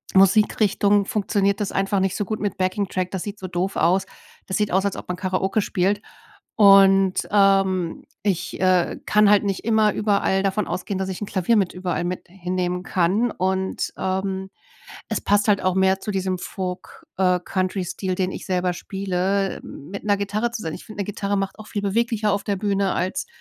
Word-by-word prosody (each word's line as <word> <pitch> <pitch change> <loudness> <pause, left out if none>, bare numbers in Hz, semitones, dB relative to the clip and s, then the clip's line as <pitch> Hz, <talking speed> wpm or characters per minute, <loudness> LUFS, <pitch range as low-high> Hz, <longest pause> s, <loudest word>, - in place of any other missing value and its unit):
Musikrichtung 205 +1 +4
funktioniert 200 -1 0
das 205 - -2
einfach 195 0 +1
nicht 190 0 0
so 205 - 0
gut 215 +2 -3
mit 205 -1 -2
Backing-Track, 185 -1 -1
das 190 -2 -3
sieht 205 0 -6
so 185 - -5
doof 180 +2 -2
aus. 185 +4 +2 0.4
Das 190 - -2
sieht 210 -1 0
aus, 190 +2 +2
als 200 - -1
ob - - -7
man 180 - -2
Karaoke 190 +2 0
spielt. 200 +1 0 0.5
Und, 195 -2 +5
ähm, 195 -3 +2 0.2
ich, 195 -4 -2
äh, 185 -2 +2
kann 210 -1 +4
halt 205 0 +5
nicht 195 0 -2
immer 220 -2 +3
überall 200 -2 +1
davon 195 +1 0
ausgehen, 185 +2 -3
dass 190 0 -2
ich 185 - -5
'n 210 - -3
Klavier 195 +5 +1
mit 195 -4 +1
überall 180 -1 -2
mit 180 +1 -4
hinnehmen 180 0 -3
kann. 195 +7 +1
Und, 190 +1 -1
ähm, 190 0 -2 0.6
es - - -1
passt 205 +1 +2
halt 205 -2 +4
auch 185 -1 +1
mehr 190 0 +3
zu 215 - -4
diesem 190 -1 -1
Folk 180 0 -6
äh, 180 -1 +3
Country-Stil, 185 0 -2
den 185 0 0
ich - - -7
selber 180 -1 0
spiele, 195 +1 -2
mit 190 +9 -9
'ner 205 -1 +2
Gitarre 210 +4 -1
zu 230 - -5
sein. 160 - -4
Ich - - -10
finde, 215 -1 -8
'ne - - -5
Gitarre 200 0 -2
macht 195 +1 -3
auch 215 - -10
viel 205 - -3
beweglicher 215 +1 +1
auf 200 - -1
der 200 - -1
Bühne 200 -1 0
als 185 +1 -2
195 Hz, 190 wpm, -23 LUFS, 185-205 Hz, 0.6 s, Und